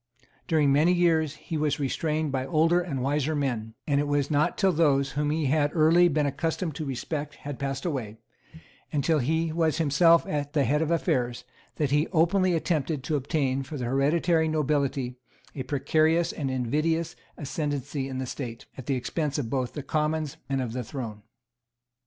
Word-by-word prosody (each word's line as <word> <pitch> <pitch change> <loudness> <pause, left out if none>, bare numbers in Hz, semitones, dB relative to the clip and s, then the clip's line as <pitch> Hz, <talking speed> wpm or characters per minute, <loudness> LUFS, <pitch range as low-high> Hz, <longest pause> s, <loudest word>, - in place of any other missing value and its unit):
During 150 -4 +3
many 155 +5 +4
years 160 -4 +2
he 160 - -5
was 150 -1 0
restrained 155 +2 -1
by 130 -1 -2
older 165 +2 +3
and 140 -8 -3
wiser 145 +2 0
men; 120 -6 -2
and 140 -2 +2
it 145 - -2
was 145 0 0
not 145 0 +2
till 195 -2 +3
those 140 -5 +2
whom 145 0 -1
he 155 0 0
had 145 +1 +2
early 165 +2 +5
been 150 -2 +1
accustomed 160 +3 -2
to 155 - -4
respect 145 +2 -4
had 145 -2 -7
passed 135 +1 -3
away, 125 -10 -3 0.7
and 145 -3 0
till 160 0 +2
he 160 +5 0
was 160 -2 +1
himself 165 +2 +4
at 145 -1 -3
the 145 - +3
head 145 +5 +1
of 160 - 0
affairs, 125 -7 0 0.3
that 145 -3 -1
he 150 +3 +2
openly 180 +2 +2
attempted 155 -4 -1
to 150 +2 -1
obtain 135 -1 0
for 145 +3 -6
the 125 - -3
hereditary 160 +6 +2
nobility 140 -4 0 0.4
a 140 - -5
precarious 160 +5 +2
and 140 -4 -3
invidious 155 +7 0 0.2
ascendency 145 -2 -3
in 130 -1 -5
the 130 - -2
State, 120 -2 -6
at 130 - -9
the 135 - +1
expense 145 +3 -2
both 130 -1 -1
of - - -27
the 145 - -4
Commons 155 0 -1
and 135 -1 0
of 115 -2 -5
the 125 0 -3
Throne. 115 -3 -6
145 Hz, 180 wpm, -27 LUFS, 135-160 Hz, 0.7 s, early